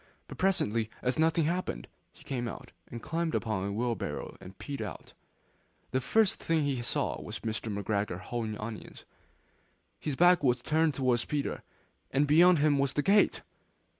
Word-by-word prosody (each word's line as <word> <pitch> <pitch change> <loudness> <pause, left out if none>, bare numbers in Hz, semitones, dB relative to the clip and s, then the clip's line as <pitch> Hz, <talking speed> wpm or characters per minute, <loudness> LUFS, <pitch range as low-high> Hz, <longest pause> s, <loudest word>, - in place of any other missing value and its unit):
But - - -10
presently, 115 - +1
as 125 +4 0
nothing 165 +1 +3
happened, 165 - -2 0.2
he - - -19
came 120 -3 -3
out, - - -8 0.2
and 120 -1 -8
climbed 165 0 -1
upon 100 -4 -1
a - - -3
wheelbarrow 115 +3 -3
and 95 +1 -11
peeped 140 -1 -6
over. - - -4 0.9
The 130 - +1
first 220 +8 +2
thing 165 -2 +1
he 135 -4 -1
saw 120 - -2
was - - -7
Mr. 110 0 -3
McGregor 100 -2 -2
hoeing 110 +1 -4
onions. 110 0 -8 0.9
His 150 -3 -3
back 175 +1 +5
was 125 -2 +2
turned 155 -1 +2
towards 125 -3 +1
Peter, 145 -1 -2 0.5
and 140 +2 +2
beyond 170 +4 +6
him 145 -1 +3
was 140 -1 +1
the 145 - 0
gate! 205 +1 +3
130 Hz, 165 wpm, -30 LUFS, 110-160 Hz, 0.9 s, beyond